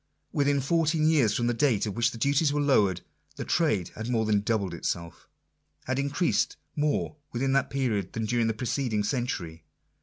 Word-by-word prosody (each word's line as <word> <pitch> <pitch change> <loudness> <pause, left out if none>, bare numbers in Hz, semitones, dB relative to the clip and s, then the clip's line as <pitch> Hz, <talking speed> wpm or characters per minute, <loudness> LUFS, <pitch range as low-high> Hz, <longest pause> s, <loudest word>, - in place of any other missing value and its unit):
Within 140 -1 +2
fourteen 155 +2 +2
years 145 -9 +3
from 120 - 0
the 120 - +1
date 120 -4 +2
at 105 - -3
which 120 +1 +2
the 115 - -9
duties 140 +5 +2
were 145 - 0
lowered, 105 -11 +3 0.3
the - - -5
trade 150 - +1
had 110 +2 -7
more 115 -3 +1
than 105 -1 +2
doubled 100 -4 -1
itself 85 0 -5 0.3
— - - -42
had 130 +1 -1
increased 140 +5 0 0.2
more 150 0 -1
within 135 +2 0
that 135 0 +2
period 115 -9 -1
than 110 -1 -2
during 115 +1 +1
the 110 - -1
preceding 120 -2 -1
century. 95 - -3
120 Hz, 185 wpm, -27 LUFS, 105-140 Hz, 0.3 s, years